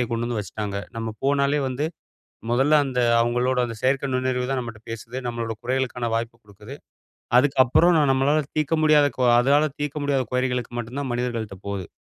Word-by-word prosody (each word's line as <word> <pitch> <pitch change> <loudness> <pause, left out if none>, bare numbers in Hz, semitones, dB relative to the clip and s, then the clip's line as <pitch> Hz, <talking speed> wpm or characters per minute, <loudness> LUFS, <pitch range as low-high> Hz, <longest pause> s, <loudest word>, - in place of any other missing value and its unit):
அ - - -8
கொண்டு 115 0 -1
வந்து 120 -2 -2
வச்சுட்டாங்க. 105 0 -5 0.2
நம்ம 115 0 -3 0.2
போனாலே 140 +1 +2
வந்து 130 +4 -2 0.6
மொதல்ல, 135 +5 +2
அந்த 125 -2 -2 0.2
அவுங்களோட 120 +2 +1
அந்த 115 -1 -6
செயற்கை 135 +2 +1
நுண்ணறிவுதான் 130 +1 -1
நம்மட்ட 115 -2 -8
பேசுது. 115 +3 -7
நம்மளோட 115 -1 -3
குறைகளுக்கான 125 -1 -2
வாய்ப்பு 115 0 -3
குடுக்குது. 105 +5 -12 0.6
அதுக்கப்பறம் 145 +5 +4 0.2
நம்மளால 140 +3 +2
தீர்க்க 155 +1 +1
முடியாத 150 -2 +5
கொ - - 0 0.2
அதால 145 +4 +3
தீர்க்க 145 0 -3
முடியாத 135 -2 +1
குறைகளுக்கு 125 -1 -1
மட்டுந்தான் 125 +3 -4
மனிதர்கள்ட்ட 120 -4 -3
போகுது. 95 -4 -4
125 Hz, 155 wpm, -23 LUFS, 115-140 Hz, 0.6 s, முடியாத